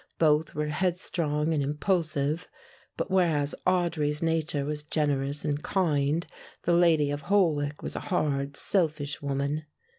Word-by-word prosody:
Both 155 Hz, -1 st, +2 dB
were 150 Hz, 0 st, -1 dB
headstrong 165 Hz, -2 st, 0 dB
and 150 Hz, -, +1 dB
impulsive, 150 Hz, +1 st, -1 dB, 0.5 s
but -, -, -3 dB
whereas 160 Hz, -6 st, +2 dB
Audry's 170 Hz, -4 st, +1 dB
nature 160 Hz, -3 st, 0 dB
was 150 Hz, 0 st, -3 dB
generous 145 Hz, -1 st, -1 dB
and 145 Hz, -1 st, -1 dB
kind, 155 Hz, -4 st, +1 dB, 0.4 s
the 175 Hz, -, +2 dB
lady 165 Hz, -4 st, +4 dB
of 145 Hz, 0 st, -3 dB
Holwick 150 Hz, -8 st, +1 dB
was -, -, -4 dB
a -, -, -2 dB
hard 140 Hz, -5 st, 0 dB
selfish 155 Hz, -6 st, +1 dB
woman. 140 Hz, +2 st, -2 dB
150 Hz, 130 wpm, -28 LUFS, 145-170 Hz, 0.5 s, lady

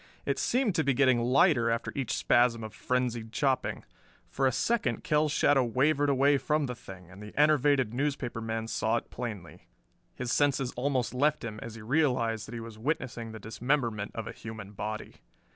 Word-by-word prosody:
It 140 Hz, -1 st, -1 dB
seemed 235 Hz, -, +1 dB
to 160 Hz, -2 st, +1 dB
be 140 Hz, -2 st, +1 dB
getting 130 Hz, -2 st, +4 dB
lighter 125 Hz, 0 st, +4 dB
after 115 Hz, +1 st, -1 dB
each 130 Hz, -5 st, -2 dB
spasm 120 Hz, -2 st, +3 dB
of 110 Hz, -1 st, -7 dB
frenzied 120 Hz, -2 st, -2 dB
chopping. 130 Hz, 0 st, 0 dB, 0.5 s
For 135 Hz, -, +2 dB
a -, -, +2 dB
second 230 Hz, -, 0 dB
Kell's 150 Hz, -2 st, +2 dB
shadow 145 Hz, -2 st, +3 dB
wavered 140 Hz, +5 st, +2 dB
away 140 Hz, +1 st, +4 dB
from 150 Hz, +1 st, 0 dB
the 125 Hz, -, -3 dB
thing, 95 Hz, -6 st, -12 dB
and 95 Hz, +3 st, -12 dB
the 105 Hz, 0 st, -11 dB
enervated 145 Hz, -5 st, +3 dB
newspaper 130 Hz, -3 st, -2 dB
man 115 Hz, 0 st, -3 dB
saw 115 Hz, 0 st, 0 dB
it -, -, -7 dB
plainly. 105 Hz, -8 st, -7 dB, 0.5 s
His 125 Hz, -1 st, -3 dB
senses 135 Hz, -2 st, +1 dB
almost 130 Hz, -1 st, 0 dB
left 150 Hz, +3 st, +1 dB
him 110 Hz, -2 st, -6 dB
as 115 Hz, -1 st, -7 dB
he 115 Hz, -, -10 dB
realized 115 Hz, -5 st, +1 dB
that 120 Hz, -, -8 dB
he -, -, -4 dB
was 115 Hz, -1 st, -9 dB
witnessing 125 Hz, -4 st, -3 dB
the 110 Hz, -, -8 dB
dismemberment 115 Hz, -1 st, -1 dB
of 115 Hz, -, -4 dB
a -, -, -5 dB
human 110 Hz, -3 st, -8 dB
body. 110 Hz, +1 st, -6 dB
125 Hz, 185 wpm, -29 LUFS, 115-140 Hz, 0.5 s, getting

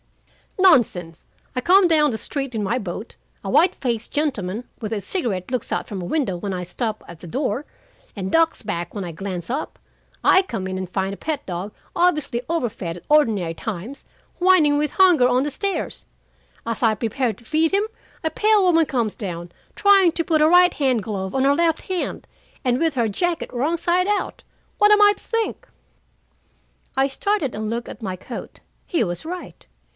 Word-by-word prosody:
"Nonsense. 220 Hz, -, +3 dB, 0.3 s
I 255 Hz, -, 0 dB
come 370 Hz, +5 st, +6 dB
down 305 Hz, -3 st, +4 dB
the 225 Hz, -, -2 dB
street 275 Hz, 0 st, -4 dB
in 215 Hz, -, -1 dB
my 230 Hz, +6 st, 0 dB
boat. 200 Hz, +2 st, -6 dB, 0.3 s
A -, -, -4 dB
white 365 Hz, +2 st, +4 dB
faced 235 Hz, -3 st, -3 dB
gentleman 235 Hz, -8 st, -1 dB, 0.2 s
with 215 Hz, -2 st, -5 dB
a 210 Hz, -, -2 dB
cigarette 200 Hz, -, -2 dB
looks 250 Hz, -, -2 dB
out -, -, -1 dB
from 200 Hz, -4 st, -5 dB
a -, -, -5 dB
window 245 Hz, -, -1 dB
when 195 Hz, +2 st, -4 dB
I 180 Hz, -1 st, -3 dB
stop 215 Hz, +4 st, -3 dB
at 170 Hz, -1 st, -11 dB
the 175 Hz, -, -9 dB
door, 265 Hz, -, -2 dB, 0.5 s
and 190 Hz, -2 st, -4 dB
ducks 330 Hz, -4 st, +2 dB
back 175 Hz, -4 st, -4 dB
when 200 Hz, -, -3 dB
I 175 Hz, -, -5 dB
glance 180 Hz, +1 st, -5 dB
up. 275 Hz, +5 st, -3 dB, 0.5 s
I 375 Hz, -, +6 dB
come 225 Hz, -, -4 dB
in 190 Hz, 0 st, -3 dB
and 185 Hz, -1 st, -4 dB
find 190 Hz, +1 st, -1 dB
a -, -, -8 dB
pet 300 Hz, -2 st, -3 dB
dog, 185 Hz, +3 st, -4 dB, 0.2 s
obviously 305 Hz, -8 st, +1 dB
overfed 215 Hz, -, -2 dB
at -, -, -14 dB
ordinary 220 Hz, -, +3 dB
times, 220 Hz, +8 st, -6 dB, 0.3 s
whining 350 Hz, -6 st, +5 dB
with 300 Hz, 0 st, 0 dB
hunger 355 Hz, -10 st, +5 dB
on 250 Hz, +1 st, +2 dB
the 295 Hz, -, -2 dB
stairs. 395 Hz, +7 st, -3 dB, 0.6 s
As 230 Hz, -1 st, -3 dB
I 225 Hz, -3 st, +3 dB
prepare 230 Hz, +3 st, -1 dB
to 230 Hz, +4 st, -19 dB
feed 315 Hz, +3 st, +2 dB
him, 400 Hz, +1 st, +2 dB, 0.4 s
a 320 Hz, -, 0 dB
pale 425 Hz, +4 st, +3 dB
woman 330 Hz, -3 st, +4 dB
comes 235 Hz, -5 st, 0 dB
down, 175 Hz, -4 st, -6 dB, 0.2 s
trying 395 Hz, -4 st, +5 dB
to 335 Hz, -, 0 dB
put 320 Hz, -2 st, +2 dB
a 310 Hz, -, +6 dB
right 360 Hz, +1 st, +6 dB
hand 255 Hz, -7 st, +1 dB
glove 190 Hz, -1 st, -4 dB
on 265 Hz, -, +2 dB
her 280 Hz, +1 st, +4 dB
left 330 Hz, -1 st, +1 dB
hand, 370 Hz, -2 st, -3 dB, 0.4 s
and 250 Hz, 0 st, +2 dB
with 325 Hz, -3 st, +1 dB
her 235 Hz, -3 st, +2 dB
jacket 340 Hz, -, -2 dB
wrong 290 Hz, +8 st, 0 dB
side 355 Hz, +2 st, +1 dB
out. 415 Hz, -1 st, -1 dB, 0.4 s
What 415 Hz, 0 st, +6 dB
am 420 Hz, 0 st, +6 dB
I 410 Hz, 0 st, +7 dB
to -, -, -19 dB
think?" 455 Hz, -1 st, -2 dB, 1.3 s
I 270 Hz, 0 st, +4 dB
started 295 Hz, -, -1 dB
and 215 Hz, 0 st, -3 dB
looked 235 Hz, +1 st, -3 dB
at -, -, -10 dB
my 190 Hz, -4 st, -3 dB
coat. 210 Hz, +7 st, -9 dB, 0.3 s
He 335 Hz, -, +1 dB
was 175 Hz, -, -4 dB
right. 360 Hz, +2 st, -7 dB
255 Hz, 195 wpm, -22 LUFS, 200-330 Hz, 1.3 s, I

